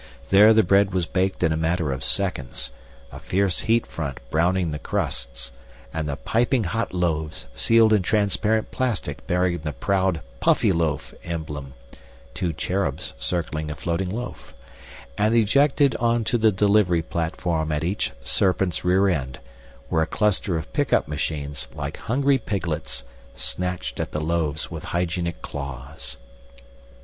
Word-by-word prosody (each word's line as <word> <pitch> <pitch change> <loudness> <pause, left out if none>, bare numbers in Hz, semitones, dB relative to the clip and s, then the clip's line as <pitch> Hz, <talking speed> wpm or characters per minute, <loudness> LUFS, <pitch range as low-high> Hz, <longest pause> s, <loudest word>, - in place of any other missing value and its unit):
There 105 +3 +8
the 110 0 +6
bread 100 +1 +3
was 90 -2 +2
baked 95 +2 0
in 80 - +3
a - - +1
matter 80 -2 0
of 65 0 -3
seconds, 70 -5 -1 0.4
a - - -8
fierce 95 -1 +1
heat 115 +1 +2
front 70 -6 -5
browning 85 +1 +2
the 75 - -4
crusts, - - -2 0.4
and 80 -2 -2
the 70 - -1
piping 115 - +1
hot 115 +6 -1
loaves 80 -4 -1
sealed 115 - +5
in 105 - +4
transparent 105 +2 +1
plastic 110 - -2
bearing 90 -1 +1
the 75 -1 -4
proud 95 -1 +1 0.2
Puffyloaf 80 +2 +2
emblem 75 -5 -5 0.6
(two 85 +4 -1
cherubs 90 +5 -2
circling 80 -3 -2
a 75 - -4
floating 85 +3 -2
loaf) 120 +6 -6 0.6
and 110 +2 +3
ejected 135 +4 +4
onto 120 0 +1
the 110 0 +5
delivery 100 -3 +3
platform 80 -1 -1
at 75 0 0
each 95 +5 -1
serpent's 95 -2 +1
rear 95 +2 +4
end, 65 -8 -1 0.5
where 80 - +2
a 80 - +1
cluster 105 -4 +1
of 80 - -7
pickup - - +2
machines, 75 -2 -3
like - - -4
hungry 135 +3 +2
piglets, 85 - -3 0.3
snatched 90 +8 -3
at - - -3
the 75 - -1
loaves 80 -1 -1
with - - -6
hygienic 85 -1 -2
claws. 70 0 -5
90 Hz, 140 wpm, -24 LUFS, 75-100 Hz, 0.6 s, There